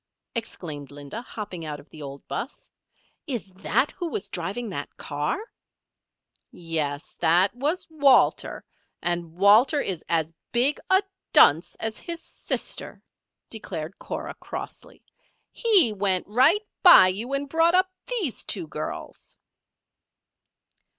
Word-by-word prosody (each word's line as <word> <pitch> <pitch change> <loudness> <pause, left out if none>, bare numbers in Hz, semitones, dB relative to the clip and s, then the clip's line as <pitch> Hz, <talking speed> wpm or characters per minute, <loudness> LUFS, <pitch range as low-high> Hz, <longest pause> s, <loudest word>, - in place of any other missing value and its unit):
exclaimed 155 - -5
Linda, 145 +9 -8
hopping 205 -8 -7
out 150 -2 -5
of 145 - -16
the 155 - -11
old 140 -1 -9
'bus. 270 - -6 0.6
"Is 235 -8 -4
that 255 +8 +1
who 350 - -5
was 205 - -4
driving 195 +7 -4
that 145 -5 -6
car?" 145 - -2 1.1
"Yes. 155 -4 -2
That 175 +4 +3
was 300 +8 -1
Walter. 285 -5 +3 0.4
And 170 -1 -2
Walter 215 - +5
is 185 - -2
as 165 -1 +1 0.2
big 255 +5 +2
a 380 +1 +5 0.3
dunce 160 +5 +5
as 220 0 -3
his 340 -1 -5
sister," - - -4 0.5
declared 190 -6 -6
Cora, - - -5
crossly. - - -9 0.5
"He 395 - +5
went 190 -2 +1
right 275 - +3 0.2
by 350 - +9
you 225 +8 -3
and 280 +1 -1
brought 330 +4 +3
up 370 0 +3 0.2
these 410 - 0
two 185 -5 0
girls." 155 0 -7
205 Hz, 125 wpm, -25 LUFS, -, 1.1 s, by